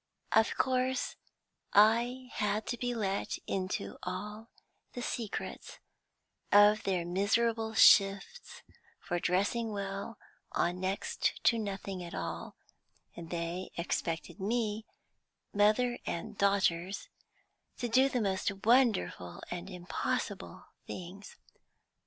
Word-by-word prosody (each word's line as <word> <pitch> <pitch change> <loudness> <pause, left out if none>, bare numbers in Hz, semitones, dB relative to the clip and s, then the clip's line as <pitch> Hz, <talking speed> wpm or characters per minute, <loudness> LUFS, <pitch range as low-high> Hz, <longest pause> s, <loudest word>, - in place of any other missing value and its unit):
Of 220 +1 +3
course 255 0 0 0.6
I 240 +5 +4
had 210 0 0
to 240 - -1
be 245 -1 -1
let 200 -3 -1
into 185 -1 -3
all 210 +5 -6 0.4
the 245 - -5
secrets 225 -5 -4 0.7
of 205 +1 +7
their 185 -3 -1
miserable 220 +5 +1
shifts 200 - +4 0.4
for 175 - -2
dressing 205 +6 0
well 200 +2 -4 0.4
on 175 +1 0
next 190 +1 -1
to 230 - +4
nothing 195 -3 -4
at 170 - -7
all, - - -5 0.6
and 165 -1 -8
they 170 +2 -3
expected 170 +1 -2
me 215 +1 -1 0.7
mother 215 +4 +3
and 215 +6 -4
daughters 195 -2 +1 0.7
to 245 - -2
do 260 +3 +4
the 250 -3 0
most 195 -1 0
wonderful 220 - +2
and 175 +2 -5
impossible 180 -1 -3 0.2
things. 185 +3 -8
205 Hz, 105 wpm, -32 LUFS, 185-230 Hz, 0.7 s, of